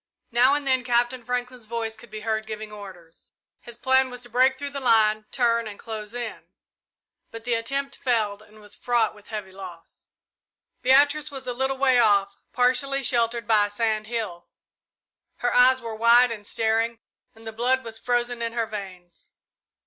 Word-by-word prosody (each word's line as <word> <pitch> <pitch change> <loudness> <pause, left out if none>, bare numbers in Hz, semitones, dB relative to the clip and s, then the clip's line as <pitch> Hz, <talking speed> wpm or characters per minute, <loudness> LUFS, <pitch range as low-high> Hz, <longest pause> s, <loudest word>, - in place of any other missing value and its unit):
Now 250 +4 +4
and 290 -1 -3
then 260 -2 +2
Captain 245 0 +1
Franklin's 250 -1 -4
voice 225 -1 -3
could 230 +1 -15
be 215 0 -7
heard 220 0 -2
giving 215 -1 -6
orders. 185 -5 -12 0.3
His 240 -1 -11
plan 260 +1 +3
was 250 0 -9
to 245 - -8
break 260 +2 +3
through 285 +1 -5
the 280 - -4
line, 215 -4 +3
turn, 235 -2 +1
and 205 -1 -8
close 220 0 -7
in, 240 -2 -6 0.8
but 230 -1 -9
the 240 +1 -1
attempt 275 +4 -2
failed 215 -5 0
and 215 0 -18
was 210 -1 -8
fraught 240 -3 +1
with 210 -1 -18
heavy 210 -3 -6
loss. 185 -3 -12 0.7
Beatrice 285 +3 +4
was 270 -2 -8
a 250 - -2
little 265 +2 -1
way 260 -2 +4
off, 200 -3 +3 0.2
partially 260 +2 +1
sheltered 235 -2 0
by 210 -2 +4
a - - -12
sand 215 0 -1
hill. 215 -7 -4 0.9
Her 245 -7 -1
eyes 255 +1 +5
were 230 -1 -6
wide 235 +2 +5
and 205 -3 -7
staring, 225 +1 0 0.4
and 225 0 -16
the 220 - -6
blood 255 +3 +1
was 225 -1 -7
frozen 245 0 -1
in 230 0 -2
her 230 -1 0
veins. 190 -5 -9
230 Hz, 180 wpm, -25 LUFS, 215-250 Hz, 0.9 s, eyes